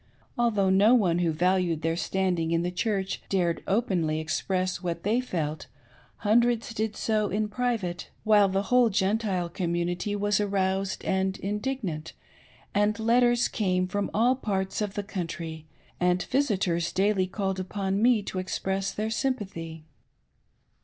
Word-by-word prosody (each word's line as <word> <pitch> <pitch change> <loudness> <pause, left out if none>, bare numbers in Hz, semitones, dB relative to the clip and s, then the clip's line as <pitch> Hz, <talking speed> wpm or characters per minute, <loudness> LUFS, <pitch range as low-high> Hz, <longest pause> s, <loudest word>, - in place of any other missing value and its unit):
Although 210 -5 +2
no 205 +6 +6
one 180 -7 +2
who 170 -2 +2
valued 175 0 +1
their 165 0 +1
standing 180 -2 0
in 165 0 +1
the 180 - -1
Church 195 +1 -1
dared 175 -4 +1
openly 180 -7 +1
express 185 +3 -1
what 170 -2 -3
they 225 +5 +2
felt, 160 -10 -3 0.6
hundreds 235 +1 +2
did 220 -1 -2
so 215 -2 0
in 210 +1 0
private; 210 -6 -2
while 210 -2 +5
the 195 +1 0
whole 245 +2 +4
Gentile 195 -2 0
commu 170 0 -1
nity 175 +4 -2
was 205 0 +1
aroused 195 -1 -1
and 190 0 0
indignant, 205 - -3 0.6
and 205 +1 +2
letters 240 +1 +3
came 185 -3 0
from 205 +2 -2
all 240 +4 +3
parts 195 -5 -2
of 205 -2 -3
the 205 - -2
country, 165 -5 -5 0.3
and'^ 180 0 +2
visitors 190 -11 0
daily 195 -1 +2
called 190 0 -2
upon 195 +1 -2
me 235 -3 +4
to 190 - -4
express 190 +1 -2
their 215 +1 -3
sympathy. 190 - -3
195 Hz, 145 wpm, -27 LUFS, 180-215 Hz, 0.6 s, no